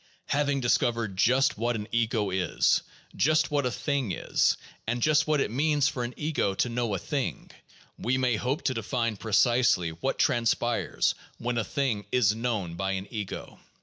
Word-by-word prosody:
Having 145 -1 +1
discovered 115 -4 +1
just 125 +4 +3
what 120 +1 0
an 105 -1 -4
ego 115 -4 0
is, 90 -3 +2 0.3
just 155 +2 +2
what 145 -3 +1
a - - -2
thing 135 -1 -1
is, - - +1 0.3
and 120 +2 0
just 155 +4 +3
what 155 -1 +2
it 110 - 0
means 145 +2 +2
for 125 -4 -2
an 120 +1 -5
ego 150 -10 -1
to 125 - 0
know 115 -3 -1
a - - 0
thing, 130 - -3 0.5
we 130 +2 0
may 125 -2 +2
hope 125 +6 -2
to 130 - +1
define 115 0 -1
precisely 110 -4 +2
what 85 +12 -3
transpires 120 0 +1 0.2
when 120 0 -2
a - - 0
thing 115 -2 -2
is 110 -5 +3
known 110 -7 -2
by 95 +2 -2
an 95 0 -3
ego. 105 -5 -6
120 Hz, 175 wpm, -27 LUFS, 105-135 Hz, 0.5 s, just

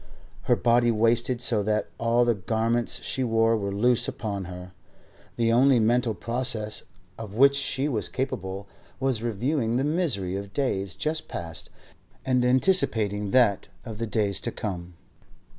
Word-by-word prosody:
Her - - +6
body 120 0 +3
wasted 115 +2 +1
so 115 -3 +2
that 105 +1 -1
all 115 +1 +2
the 120 - +3
garments 115 +4 -1
she 130 - -2
wore 115 -1 +2
were 100 -2 -2
loose 120 +4 +2
upon 100 -4 -4
her. 90 +1 -9 0.6
The 115 -1 +1
only 130 +2 +5
mental 115 0 +1
process 115 +1 -2 0.3
of 105 -2 -8
which 140 +3 +5
she 140 0 0
was 115 -8 0
capable 100 -7 -4 0.3
was 130 -4 0
reviewing 120 +2 -1
the 130 - +1
misery 145 - 0
of 100 0 -6
days 100 -9 -2
just 155 +1 -2
past 80 -2 -6 0.6
and 125 -1 +2
anticipating 115 - +2
that 115 -4 +3 0.2
of 110 -3 -8
the 115 - -2
days 105 -3 0
to 120 - -2
come. 90 -5 -6
115 Hz, 150 wpm, -26 LUFS, 100-125 Hz, 0.6 s, Her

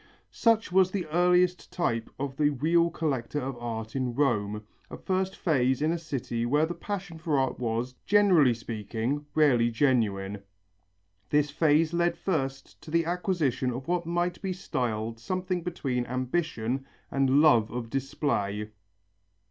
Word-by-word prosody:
Such 225 -4 +2
was 185 0 +5
the 185 -2 -3
earliest 180 +2 +2
type 115 -10 -1
of 135 0 -4
the 150 -1 +3
real 165 +5 +2
collector 145 -4 -2
of 135 0 -4
art 115 -1 -5
in 125 -3 -1
Rome, 105 -6 0 0.3
a - - -7
first 190 0 -1
phase 130 -6 +1
in 155 +2 +1
a 170 - -1
city 130 -7 -3
where 145 +6 +2
the 170 - -4
passion 185 -4 -6
for 155 -2 0
art 130 -1 0
was, 120 +1 -2
generally 185 - +5
speaking, 115 +5 -3
rarely 130 -7 +4
genuine. 105 -6 0 0.9
This 145 0 +2
phase 155 +2 +3
led 170 0 +1
first 135 -7 -3
to - - -11
the 165 +1 +2
acquisition 170 -7 0
of 125 +2 -5
what 175 -1 -1
might 175 +1 -1
be 190 -2 -2
styled 115 -9 -3
something 185 +7 -2
between 135 -8 -2
ambition 130 -1 -2 0.3
and 135 0 +3
love 120 -8 +5
of 115 -1 -5
display. 110 -6 -2
140 Hz, 150 wpm, -28 LUFS, 120-170 Hz, 0.9 s, was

